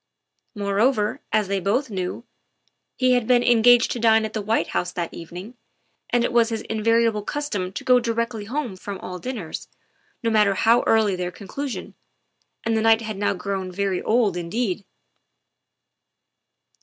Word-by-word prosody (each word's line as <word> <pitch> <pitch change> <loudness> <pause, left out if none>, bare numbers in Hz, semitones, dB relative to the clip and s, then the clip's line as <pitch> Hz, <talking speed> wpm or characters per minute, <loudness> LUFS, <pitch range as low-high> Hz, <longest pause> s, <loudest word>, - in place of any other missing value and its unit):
Moreover, 210 +2 +1
as 215 -2 +2
they 195 0 0
both 225 +7 0
knew, 185 +3 -4 0.7
he 255 -1 +3
had 245 -3 +1
been 245 -1 +4
en 240 -2 +4
gaged 245 0 +6
to 245 - -3
dine 220 -1 +4
at 220 - -6
the 215 - -2
White 220 +2 0
House 180 - -1
that 170 -2 -4
evening, 180 +7 -9 0.6
and 240 -1 +2
it - - -1
was 235 -1 +4
his 225 -1 -3
invariable 225 0 +1
custom 205 -7 -3
to - - -6
go 250 -1 +5
directly 230 -2 -2
home 245 -3 -3
from 195 +1 -7
all 180 0 -7
dinners, 220 -8 -6 0.6
no 230 - +1
matter 210 -2 +3
how 230 +5 +4
early 220 -3 +3
their 180 -1 -3
conclusion, 245 +9 -6 0.7
and 225 0 0
the 220 - +1
night 225 0 +4
had 215 -3 -5
now 205 0 0
grown 190 0 -4
very 195 0 -1
old 220 -5 +2
indeed. 190 +3 -2
220 Hz, 165 wpm, -23 LUFS, 195-235 Hz, 0.7 s, gaged